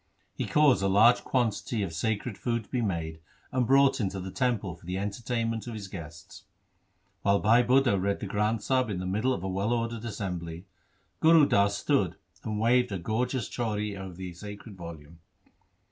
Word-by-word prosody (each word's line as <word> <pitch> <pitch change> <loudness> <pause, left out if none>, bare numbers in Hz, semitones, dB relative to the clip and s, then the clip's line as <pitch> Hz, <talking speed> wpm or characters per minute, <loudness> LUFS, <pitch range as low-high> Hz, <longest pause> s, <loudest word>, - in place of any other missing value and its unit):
He - - -3
caused 150 -7 +4
a 95 - +2
large 110 +5 +5
quantity 115 -3 0
of 85 -4 -4
sacred 110 +6 -2
food 115 +2 -2
to - - -25
be 125 - 0
made 80 -6 -2 0.3
and 125 -2 +1
brought 135 0 +5
into 95 -1 -2
the 95 0 -6
temple 115 -8 -1
for 80 - -17
the 90 +1 -2
entertainment 115 +3 -2
of 120 - -5
his 105 -3 -6
guests. 85 +3 -10 0.8
While 100 0 +3
Bhai 115 +3 +5
Budha 125 -6 +3
read 100 +1 0
the - - -5
Granth 105 +2 0
Sahib 130 -1 +1
in 100 - -2
the 90 - -4
middle 105 +8 0
of 130 - -2
a - - -2
well 95 +4 -1
ordered 115 -1 -1
assembly 90 -6 -5 0.5
Gur 160 -2 +6
Das 100 -4 +2
stood 100 - +1 0.3
and 105 -2 -3
waved 125 +1 +3
a 100 - -1
gorgeous 115 +5 -1
chauri 105 -3 -2
over 95 -2 -7
the 90 -1 -7
sacred 100 +3 -9
volume. 85 -2 -10
105 Hz, 185 wpm, -28 LUFS, 95-120 Hz, 0.8 s, Gur